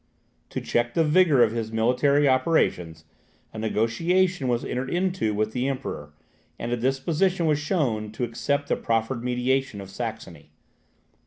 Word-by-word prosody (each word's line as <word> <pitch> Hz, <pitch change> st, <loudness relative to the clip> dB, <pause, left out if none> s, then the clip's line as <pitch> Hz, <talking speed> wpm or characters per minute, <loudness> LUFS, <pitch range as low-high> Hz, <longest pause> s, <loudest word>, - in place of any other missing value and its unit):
To -, -, -4 dB
check 120 Hz, 0 st, -1 dB
the 165 Hz, -, +4 dB
vigour 150 Hz, -4 st, +5 dB
of 110 Hz, -, +2 dB
his 115 Hz, -1 st, -3 dB
military 130 Hz, +6 st, +2 dB
operations, 110 Hz, -, +1 dB, 0.5 s
a 110 Hz, -, -6 dB
negotiation 145 Hz, -, +1 dB
was 120 Hz, -1 st, 0 dB
entered 130 Hz, +1 st, -3 dB
into 180 Hz, -, 0 dB
with 110 Hz, +1 st, 0 dB
the 125 Hz, +3 st, -1 dB
Emperor, 130 Hz, -, -4 dB, 0.5 s
and 115 Hz, -, -4 dB
a -, -, +2 dB
disposition 160 Hz, +9 st, 0 dB
was 150 Hz, -2 st, +2 dB
shown 130 Hz, -, -1 dB
to 125 Hz, -, -4 dB
accept 140 Hz, +5 st, -1 dB
the -, -, +1 dB
proffered 115 Hz, +2 st, -1 dB
mediation 125 Hz, -1 st, 0 dB
of 95 Hz, -1 st, -9 dB
Saxony. 100 Hz, -9 st, -7 dB
125 Hz, 150 wpm, -25 LUFS, 110-145 Hz, 0.5 s, vigour